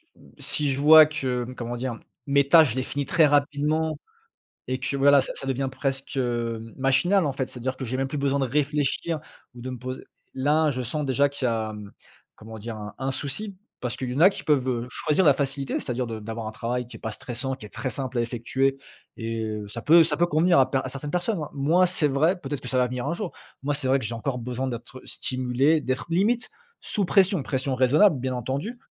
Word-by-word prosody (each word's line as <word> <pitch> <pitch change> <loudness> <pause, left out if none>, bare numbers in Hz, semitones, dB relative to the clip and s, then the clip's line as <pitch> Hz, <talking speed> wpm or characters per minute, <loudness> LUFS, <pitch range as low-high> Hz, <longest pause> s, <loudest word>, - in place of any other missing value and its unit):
mmh, - - -19
si 145 -2 0
je 135 - -2
vois 155 +1 +9
que, 130 -5 -2
comment 120 0 -4
dire? 120 -1 -3 0.3
Mes 140 0 +3
tâches, 155 -3 +7
je - - -5
les 130 - -1
finis 140 +1 -3
très 160 +3 +4
rapidement 145 +2 +1 0.7
et 130 0 -2
que 130 +2 -2
voilà, 140 +1 +6
ça 130 - -3
ça 135 - -7
devient 135 0 -1
presque, 135 +1 -3
hem, 115 -3 -2
machinal, 155 +7 +2
en 140 - 0
fait, 130 -1 -3
c'est-à-dire 130 +1 -4
que 130 - -5
j'ai 130 +1 -3
même 135 0 0
plus 150 - -4
besoin 140 0 +1
de 135 - +1
réfléchir 150 +3 0 0.3
ou 120 - -11
de 130 - -5
me 125 - -6
poser 130 +1 -6 0.3
là, 150 +3 +2
je 130 -2 -3
sens 145 +5 -3
déjà 140 +1 +2
qu'il 140 -2 -6
y - - +2
a, 110 -2 -1 0.6
comment 110 0 -10
dire? 110 +1 -6
Un 105 0 -8
un 135 +1 -1
souci 145 +10 -4 0.2
parce 125 0 -3
qu'il 130 -2 -4
y - - -3
en 140 - -1
a 180 - +9
qui 195 - -6
peuvent, 135 -4 +2
heu, 120 -1 -1
choisir 155 +4 +1
la 145 - +7
facilité, 135 0 -2
c'est-à-dire 125 0 -3
de 110 -1 -5
d'avoir 110 +1 -5
un - - -3
travail 125 +2 -3
qui 120 - -11
est - - -15
pas 110 - -4
stressant, 125 +4 -5
qui 130 - -12
est - - -14
très 130 - -4
simple 130 -2 -3
à - - +3
effectuer 130 +3 0 0.4
et 115 -1 -3 0.2
ça 115 +3 -6
peut 165 +2 +7
ça 150 -2 -1
peut 175 - +3
convenir 170 +1 +3
à 130 0 +3
per 135 - +1
à - - -3
certaines 140 +2 -6
personnes. 180 +3 -1
Moi, 160 +6 +3
c'est 175 -3 +1
vrai, 155 +7 +2
peut-être 145 -2 -4
que 125 - -8
ça 130 - -2
va 125 - +4
venir 125 +1 -4
un 165 - -1
jour. 185 -1 -5 0.3
Moi, 145 +1 0
c'est 140 -2 -2
vrai 135 +1 +4
que 130 - -6
j'ai 115 - -3
encore 125 +3 -3
besoin 125 +2 -3
d'être 120 +2 -7
stimulé, 130 +5 +1
d'être 130 -2 -2
limite 210 +8 +1 0.3
sous 205 -3 -2
pression, 190 -3 +3
pression 135 0 -2
raisonnable, 140 +6 +4
bien 130 0 -2
entendu, 140 - -3
135 Hz, 235 wpm, -25 LUFS, 125-150 Hz, 0.7 s, vois